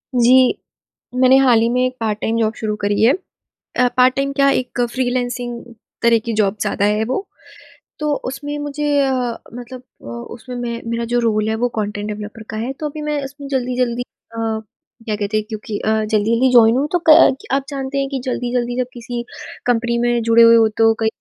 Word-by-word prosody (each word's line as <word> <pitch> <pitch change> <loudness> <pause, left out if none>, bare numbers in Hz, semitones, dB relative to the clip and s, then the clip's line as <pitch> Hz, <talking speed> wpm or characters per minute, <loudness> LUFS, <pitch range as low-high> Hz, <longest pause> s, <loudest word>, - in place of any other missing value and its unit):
जी, 250 +1 +5 0.6
मैंने 260 +1 +5
हाल 250 -4 +5
ही 230 - +2
में 250 +1 +1
एक 255 0 -3
पार्ट-टाइम 220 +1 -1
जॉब 220 0 +1
शुरू 215 -1 -2
करी 205 +1 0
है। 245 - +6 0.6
अ, 250 - +4
पार्ट-टाइम 260 +2 +3
क्या 275 0 +3
एक 245 -1 -6
फ्रीलांसिंग 245 -1 -2 0.4
तरह 235 -1 +5
की 235 - -2
जॉब 200 +1 +1
ज़्यादा 200 - 0
है 210 +1 +2
वो। 260 - -3 0.7
तो 300 -1 0
उसमें 285 +3 -4
मुझे 290 +1 -4 0.2
अ, 270 -1 +1 0.4
मतलब 245 +1 -9 0.2
अ, - - -13
उसमें 120 - -8
मैं 235 -1 -4
मेरा 235 0 -2
जो 245 - +3
रोल 220 -2 +1
है 220 - 0
वो 245 +2 0
कंटेंट 205 0 -3
डेवलपर 210 +1 -7
का 215 - -5
है, 235 +4 -3
तो 300 +2 -4
अभी 305 +1 -7
मैं 300 -2 -2
उसमें 280 +1 -9
जल्दी-जल्दी 250 -2 -1
अ, 230 -1 -13 0.7
क्या 215 -2 -1
कहते 210 +1 -2
हैं 215 - -2
क्योंकि 215 -1 -5
अ, 220 - -2 0.2
जल्दी-जल्दी 230 +4 +2
जॉइन 230 -1 +6
हूँ 285 +2 +1
तो 355 -2 +1
क 310 -4 +7
आप 275 0 +1
जानते 275 -1 -4
हैं 275 0 -1
कि 270 - -3
जल्दी-जल्दी 245 -1 -2
जब 250 - 0
किसी 240 0 -5 0.4
कंपनी 235 -1 +1
में 240 0 +1
जुड़े 230 0 +5
हुए 230 0 +8
हो 225 -1 +5
तो 225 0 +5
कई 220 - +1
240 Hz, 195 wpm, -19 LUFS, 225-260 Hz, 0.7 s, हुए